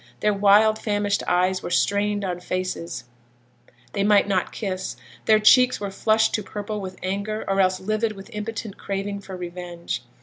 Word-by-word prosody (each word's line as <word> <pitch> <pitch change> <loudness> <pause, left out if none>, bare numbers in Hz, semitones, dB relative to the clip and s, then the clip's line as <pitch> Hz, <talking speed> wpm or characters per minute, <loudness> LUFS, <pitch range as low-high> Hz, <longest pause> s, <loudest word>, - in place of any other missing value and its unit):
Their 210 - +3
wild, 205 +2 +5
famished 205 -2 0
eyes 185 +1 +2
were - - -5
strained 205 +2 +1
on 180 -2 -3
faces 185 -1 -4 0.9
they 200 - 0
might 205 -1 +4
not 190 -3 0
kiss, 190 -3 -4 0.3
their 220 - +6
cheeks 250 +4 +5
were 200 -1 -4
flushed 220 +2 +2
to 215 - +1
purple 210 +1 -5
with 185 -1 -7
anger 200 +3 -2
or 195 0 +2
else 185 0 +2
livid 215 +3 -1
with 195 -1 -12
impotent 215 -1 -5
craving 200 +1 -3
for 195 -2 -8
revenge. 175 -3 -5
200 Hz, 165 wpm, -24 LUFS, 185-210 Hz, 0.9 s, their